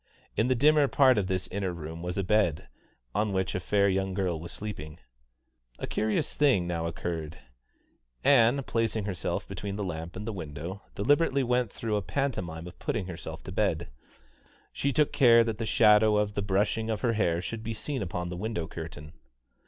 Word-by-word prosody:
In 110 - +2
the 130 - +3
dimmer 150 +3 +5
part 130 -4 +5
of 95 - -1
this 95 -1 -1
inner 95 -1 -1
room 80 -1 -7
was 90 +2 -4
a 100 - +1
bed, 95 -6 +1 0.5
on 105 0 0
which 95 0 0
a - - -1
fair 100 +2 +2
young 95 -1 0
girl 90 -4 -1
was 85 +2 -8
sleeping. 80 -7 -7 0.8
A - - -4
curious 110 -1 -1
thing 135 -12 +3
now 85 -1 -2
occurred. 80 -2 -4 0.9
Ann, 135 0 +5
placing 115 -3 -1
herself 95 -4 -3
between 100 -1 -5
the 105 - -3
lamp 85 -2 -5
and 105 - -6
the 115 - -3
window, 85 +2 -6
deliberately 140 +4 +2
went 125 -3 +1
through 110 -2 -2
a - - -1
pantomime 90 - -3
of 90 - -11
putting 110 -5 -2
herself 90 -2 -7
to - - -7
bed. - - 0 0.8
She 140 - 0
took 150 +2 +2
care 120 -4 +7
that 115 -1 -3
the 115 - -2
shadow 105 0 +5
of 105 0 +1
the 100 - -1
brushing 105 +3 0
of 110 - -1
her 120 -2 +2
hair 85 -6 +1
should 110 +5 -5
be 115 0 -4
seen 135 +4 -4
upon 90 -2 -3
the 90 - -5
window 105 -4 -2
curtain. 80 -2 -8
100 Hz, 190 wpm, -28 LUFS, 85-115 Hz, 0.9 s, care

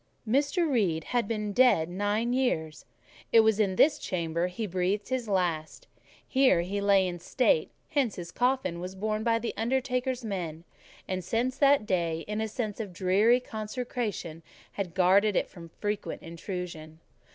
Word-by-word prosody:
Mr. 285 - +2
Reed 195 - +1
had 240 +1 -1
been 210 -2 -2
dead 245 -10 +4
nine 205 +6 -1
years: 160 - -1 0.5
it 225 - +8
was 220 -1 +2
in 195 -3 +2
this 295 +10 +4
chamber 170 -1 -1
he 200 +5 -4
breathed 190 +3 -1
his 255 -3 -2
last; 175 - -1 0.4
here 260 -10 +4
he 200 +4 -3
lay 200 -2 +4
in 175 -1 -5
state; 260 - +1 0.2
hence 275 -9 0
his 170 -1 -7
coffin 245 -9 0
was 180 +2 -6
borne 215 +2 -2
by 230 0 +2
the 230 +1 -3
undertaker's 250 +1 -1
men; 170 -6 -4 0.4
and, 185 -1 -3
since 240 +7 -1
that 280 -5 +4
day, 170 -4 -1
a 215 +1 -2
sense 215 -1 -4
of 210 -4 -4
dreary 200 +7 +3
consecration 215 -7 -4 0.3
had 185 -4 -5
guarded 195 +3 +4
it - - +1
from 170 -3 -12
frequent 210 -1 -3
intrusion. 165 -2 -7
205 Hz, 155 wpm, -28 LUFS, 180-240 Hz, 0.5 s, it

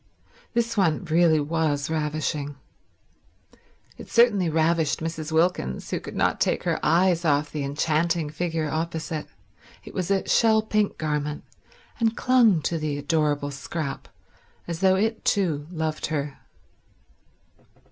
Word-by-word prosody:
This 235 0 0
one 180 -5 +1
really 160 -1 +4
was 150 -1 0
ravishing. 150 -2 -2 1.4
It - - -10
certainly 210 -7 +4
ravished 160 -1 +1
Mrs. 160 -1 -4
Wilkins, 160 - 0
who - - -1
could - - -9
not - - +1
take - - +1
her - - 0
eyes 170 +2 +3
off 150 -2 +1
the 150 -2 -3
enchanting 155 +2 0
figure 160 0 -2
opposite. 160 0 -3 0.6
It - - -11
was 185 -1 -2
a 195 -1 +1
shell 220 -1 +4
pink 215 -1 0
garment, 150 -1 -2 0.6
and 230 -1 +1
clung 230 - +4
to 165 +1 -1
the 150 -2 -2
adorable 145 -1 0
Scrap 140 +1 -5 0.6
as 170 -1 -4
though 190 0 +4
it, 220 +3 0
too, 160 -8 0
loved 160 -3 -3
her. 145 -2 -3
160 Hz, 130 wpm, -25 LUFS, 150-180 Hz, 1.4 s, really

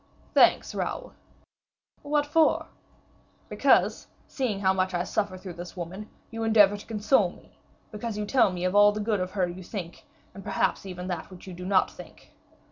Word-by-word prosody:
"Thanks, - - +4
Raoul." - - -4 0.9
"What 290 0 0
for?" 310 +2 +3 0.8
"Because, - - +2 0.2
seeing 240 -8 -2
how 190 -1 +3
much 185 -1 -1
I 175 - 0
suffer 200 -1 -2
through 185 -1 -8
this 175 +2 -9
woman, 185 +5 -7 0.2
you 225 0 -5
endeavor 210 -3 +5
to 205 - -10
console 215 -2 +2
me, - - -19 0.3
because 215 0 -5
you 210 - -2
tell 235 -2 +3
me 180 0 -3
all 205 +2 +6
the 210 - -5
good 210 -1 0
of 185 0 -2
her 190 -3 +1
you 175 +2 -8
think, 175 -2 -7 0.3
and 195 - -10
perhaps 195 0 -1
even 180 -1 -6
that 175 -3 -4
which 185 -2 -13
you 185 - -8
do 180 +1 -7
not 195 -1 +3
think." - - -14
195 Hz, 180 wpm, -27 LUFS, 180-215 Hz, 0.9 s, all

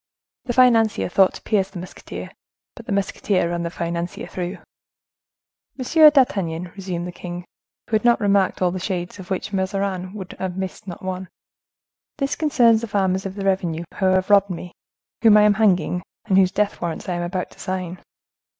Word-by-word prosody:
The 245 - -2
financier 230 -6 +4
thought 190 +1 +4
to - - -11
pierce 195 -3 +1
the 195 - -10
musketeer; 180 +1 -8 0.4
but 235 - -12
the - - -4
musketeer 195 -2 0
ran 170 0 -2
the 170 - -2
financier 170 0 -4
through. 180 0 -5 1.2
"Monsieur 305 +4 +6
d'Artagnan," 180 - +1
resumed 185 -3 -4
the 180 - -5
king, 175 0 -7 0.4
who - - -13
had 215 - -8
not 240 -1 +4
remarked 200 -3 +2
all 180 - +3
the 185 - -4
shades 180 0 -4
of 180 - -10
which 195 +2 -3
Mazarin 190 0 -2
would 190 -3 -7
have 185 -1 -3
missed 190 0 -5
not 175 0 -8
one, 185 0 -4 0.9
"this 275 -1 -1
concerns 240 -8 +4
the 230 - -4
farmers 190 -2 0
of 190 - -8
the 200 -1 -4
revenue 180 -4 0 0.2
who 190 - +1
have 185 +1 +2
robbed 200 -1 +5
me, 175 0 -6 0.5
whom 220 -2 +7
I 210 - +6
am 210 0 +5
hanging, 185 -5 +2 0.2
and 200 -3 +1
whose 190 -1 +5
death 210 0 -1
warrants 170 -2 -4
I 180 - -1
am 175 - -2
about 180 +1 -3
to - - -19
sign." 185 -1 -4
190 Hz, 185 wpm, -22 LUFS, 180-210 Hz, 1.2 s, whom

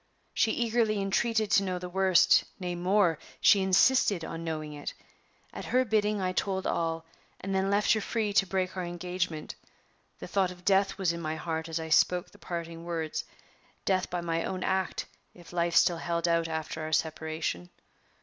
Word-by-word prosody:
She - - +2
eagerly 225 -3 +1
entreated 215 +2 +1
to 200 - +5
know 185 -2 -2
the 180 0 -6
worst 190 0 +4
nay, 180 -1 -3
more, 180 -2 +2 0.2
she 200 - +6
insisted 190 -1 +3
on 165 0 -6
knowing 155 -2 -4
it. 145 0 -6 0.6
At - - -7
her 255 +1 +2
bidding 210 -2 +1
I 185 -1 0
told 190 0 -1
all, 165 0 -1 0.3
and 195 +1 -4
then 190 0 +1
left 205 +1 +3
her 220 - 0
free 215 -1 -1
to 195 - +3
break 185 0 -1
our 185 - -2
engagement. 175 -2 -3 0.6
The - - -8
thought 195 -2 +1
of 180 0 -12
death 195 0 +3
was 180 -3 +1
in 170 - -5
my 155 -1 -2
heart 160 0 -4
as 165 0 -2
I 160 0 -5
spoke 180 +2 +3
the - - -19
parting 170 -1 -6
words 165 -2 -3 0.6
death 185 -1 +1
by 175 0 -2
my 165 -1 -1
own 185 -1 -3
act, 190 -1 -1 0.3
if 175 -1 -14
life 170 -1 0
still 175 - +5
held 170 0 -1
out 165 -1 +2
after 160 0 -4
our 155 0 -4
separation. 155 - -2
180 Hz, 185 wpm, -29 LUFS, 165-195 Hz, 0.6 s, she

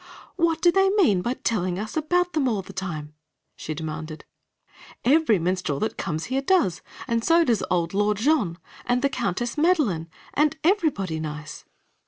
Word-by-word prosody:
"What 330 -2 +1
do 350 - +6
they 385 +1 +3
mean 345 - +3
by 240 +6 -1
telling 185 -8 -1
us 215 +2 -5
about 355 +3 +1
them 295 -4 +1
all 210 -5 -1
the - - -12
time?" 155 -6 -5 0.4
she 155 - -5
demanded. 155 0 -6 0.8
"Every 275 -4 +4
minstrel 175 -4 -1
that 220 - -1
comes 160 -3 -3
here 265 +2 -1
does, 275 - +2 0.3
and 230 -2 0
so 335 +4 +5
does 235 -8 +1
old 170 -1 0
Lord 205 +1 +1
Jean, 225 - +1 0.3
and 245 +1 +1
the 280 - +3
Countess 240 - -2
Madeline, 275 - +2 0.2
and 305 +1 +2
everybody 300 - +1
nice." 150 0 -7
225 Hz, 165 wpm, -24 LUFS, -, 0.8 s, do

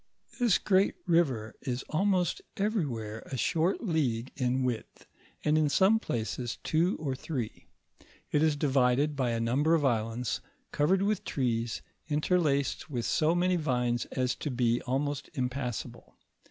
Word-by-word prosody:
This 240 -6 +4
great 195 0 +2
river 135 -11 +1
is 125 0 -3
almost 185 +1 +1
eveiywhore 130 - -2
a 130 - -2
short 170 - +1
league 135 - 0
in 130 0 0
width, 125 -3 -4 0.4
and 155 +1 +3
in 150 -1 +3
some 190 +9 +4
place, 120 - -3
two 170 +4 +1
or 145 -4 -2
three; 130 -4 -5 0.6
it 150 - +3
is 155 -2 +3
divided 140 0 +2
by 130 -3 0
a 115 -1 0
number 135 +8 +2
of 150 -3 +1
islands 115 -1 0 0.3
covered 185 +7 +2
with 205 -1 0
trees, 115 -4 -1 0.2
interlaced 150 -2 +1
with 120 -5 -2
so 160 +2 +2
many 180 +1 +2
vines 125 -6 0
as 130 -1 -1
to 150 - -3
be 120 -2 +1
almost 145 +2 -1
impassable. 125 -2 -4
140 Hz, 140 wpm, -30 LUFS, 125-165 Hz, 0.6 s, This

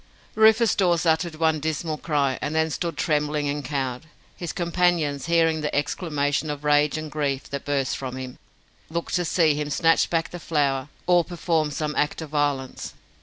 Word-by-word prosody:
Rufus 220 +1 +5
Dawes 175 -3 +2
uttered 160 0 +1
one 160 -1 +1
dismal 155 0 -2
cry, 140 -4 0
and 150 +1 -2
then 160 0 +1
stood 170 +2 -3
trembling 150 -2 0
and 145 0 -2
cowed. 135 0 -3 0.3
His 175 - -5
companions, 170 -5 0
hearing 165 -2 +2
the 150 - -2
exclamation 145 0 -1
of 145 0 -4
rage 150 +1 +3
and 155 -1 -6
grief 140 -3 -2
that 140 -1 -4
burst 140 -2 0
from 130 -2 -5
him, 130 -1 -7 0.5
looked 170 +1 -4
to 180 -1 +1
see 160 -2 +3
him 150 0 -3
snatch 165 +3 +3
back 165 -1 -1
the 175 - -7
flower 145 -4 0 0.2
or 175 -1 +4
perform 165 -3 -1
some 150 +1 -3
act 150 - 0
of 155 - -10
violence. 145 -3 -2
155 Hz, 175 wpm, -24 LUFS, 145-165 Hz, 0.5 s, Rufus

